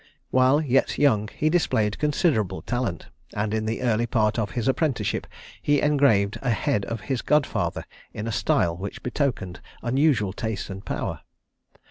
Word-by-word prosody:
While 130 +3 +4
yet 135 -3 +1
young, 110 -8 +3
he 150 - -2
displayed 110 -11 +1
considerable 150 - +1
talent, 120 -8 -3 0.3
and 105 +1 -1
in 110 0 -1
the 115 +3 -2
early 120 -1 +1
part 110 -1 +1
of 105 -3 -1
his 120 - 0
apprenticeship 135 0 0 0.3
he 145 -1 +2
engraved 135 -9 +3
a 125 - -1
head 115 -3 0
of 115 -2 -4
his 130 -4 -2
godfather 150 -2 0 0.3
in 105 - -5
a 115 - -2
style 90 -6 +1
which 95 +3 -7
betokened 125 -9 -2 0.2
unusual 125 -6 +2
taste 110 -3 -4
and 95 +1 -7
power. - - -3
120 Hz, 155 wpm, -25 LUFS, 105-140 Hz, 0.3 s, While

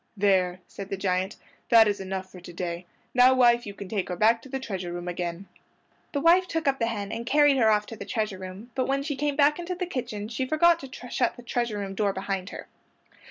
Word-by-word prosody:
"There!" 185 -2 +2
said 195 -1 -8
the 195 - -3
giant, 185 0 -1 0.3
"that 230 -2 +7
is 205 -1 0
enough 190 0 -5
for 185 - -11
to 175 0 -11
day. 175 0 -5 0.3
Now, 255 +1 +6
wife, 240 -2 +4
you 200 - -7
can 200 - -8
take 195 -1 -2
her 180 - -2
back 225 +5 +3
to 270 - -13
the 270 +1 -3
treasure 190 -8 -5
room 175 0 -6
again." 175 +1 -4 0.6
His 285 -1 -2
wife 360 +2 +5
took 325 -3 -2
up 270 -1 +2
the 230 - +1
hen 205 -3 -3
and 230 - -4
carried 290 +3 +4
her 225 -4 +4
off 210 -1 +3
to 225 - -8
the 205 - -7
treasure 215 -2 -2
room, 190 +6 -9
but 255 +1 -1
when 275 +1 0
she 290 0 -3
came 290 +1 -1
back 295 +2 +4
into 355 +1 -4
the 360 0 -2
kitchen 225 -10 -4
she 235 +4 -3
forgot 335 +3 +4
to 260 -3 -10
shut - - +1
the 245 - -11
treasure 235 -2 -2
room 195 -1 -4
door 200 0 0
behind 190 0 -3
her. - - -9
215 Hz, 245 wpm, -26 LUFS, 190-265 Hz, 0.6 s, that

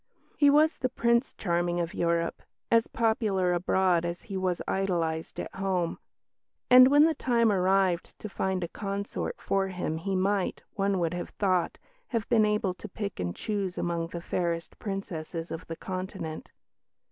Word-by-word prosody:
He 290 -1 +5
was 305 +3 +4
the 255 - 0
"Prince 235 +2 +1
Charming" 175 -1 0
of 170 -1 -2
Europe, 170 0 0 0.3
as 230 -1 +4
popular 215 -5 +1
abroad 180 0 +2
as 175 0 -4
he 200 - -7
was 185 -2 0
idolised 170 -4 -1
at - - -5
home; 185 -3 -1 0.7
and 255 0 +10
when 290 +2 +6
the 320 +1 +4
time 235 -6 +2
arrived 190 -2 +1
to - - -7
find 190 -2 -1
a - - -2
consort 200 +2 -4
for 195 0 0
him 180 -4 -3
he 190 +4 -2
might, 195 +1 0
one 195 -1 +1
would 170 -1 0
have 175 - -4
thought, 185 -4 0 0.3
have 230 -3 -2
been 220 -3 +4
able 210 -3 0
to 210 +3 -10
pick 200 +1 -5
and 90 -1 -2
choose 200 -4 -3
among 170 -1 -1
the 170 0 -6
fairest 170 -1 -2
Princesses 170 -5 -5
of 165 - -6
the 165 - -5
Continent. 185 -3 -6
190 Hz, 165 wpm, -28 LUFS, 175-210 Hz, 0.7 s, and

